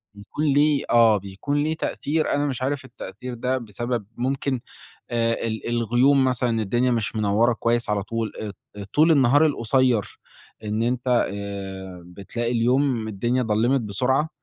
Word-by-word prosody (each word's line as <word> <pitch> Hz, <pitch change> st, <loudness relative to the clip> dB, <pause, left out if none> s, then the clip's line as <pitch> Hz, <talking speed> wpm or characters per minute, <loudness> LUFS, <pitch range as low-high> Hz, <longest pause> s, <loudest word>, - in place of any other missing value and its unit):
بيكون 100 Hz, +9 st, -4 dB
ليه، 145 Hz, 0 st, +3 dB
آه 115 Hz, -3 st, +5 dB
بيكون 100 Hz, +10 st, -2 dB
ليه 160 Hz, +1 st, -1 dB
تأثير، 155 Hz, 0 st, -1 dB
أنا 145 Hz, +1 st, +1 dB
مش 130 Hz, -3 st, -3 dB
عارف 135 Hz, 0 st, -2 dB
التأثير 125 Hz, +2 st, -8 dB
ده 125 Hz, +2 st, -1 dB
بسبب 120 Hz, -1 st, -4 dB
ممكن 130 Hz, +1 st, -1 dB, 0.5 s
آآ 115 Hz, -1 st, +1 dB
ال 110 Hz, +1 st, -4 dB
الغيوم 120 Hz, +4 st, +3 dB
مثلًا، 120 Hz, -3 st, 0 dB
الدنيا 120 Hz, +5 st, +1 dB
مش 115 Hz, -2 st, -1 dB
منوّرة 110 Hz, +3 st, +2 dB
كويس 115 Hz, -1 st, 0 dB
على 100 Hz, -1 st, 0 dB
طول، 110 Hz, +1 st, -3 dB
أ 105 Hz, -, -4 dB
ط -, -, -11 dB, 0.2 s
أ 100 Hz, -, -5 dB
طُول 155 Hz, +2 st, +5 dB
النهار 145 Hz, +2 st, +5 dB
القصيّر، 125 Hz, -4 st, +1 dB, 0.5 s
إن 105 Hz, +2 st, -1 dB
أنت 125 Hz, +1 st, -1 dB, 0.3 s
آآ 95 Hz, -3 st, -7 dB
بتلاقي 115 Hz, +6 st, -4 dB
اليوم 120 Hz, -1 st, +1 dB
الدنيا 120 Hz, +5 st, 0 dB
ضلّمِت 115 Hz, +4 st, +2 dB
بسُرعة 130 Hz, +8 st, 0 dB
120 Hz, 155 wpm, -23 LUFS, 110-130 Hz, 0.5 s, آه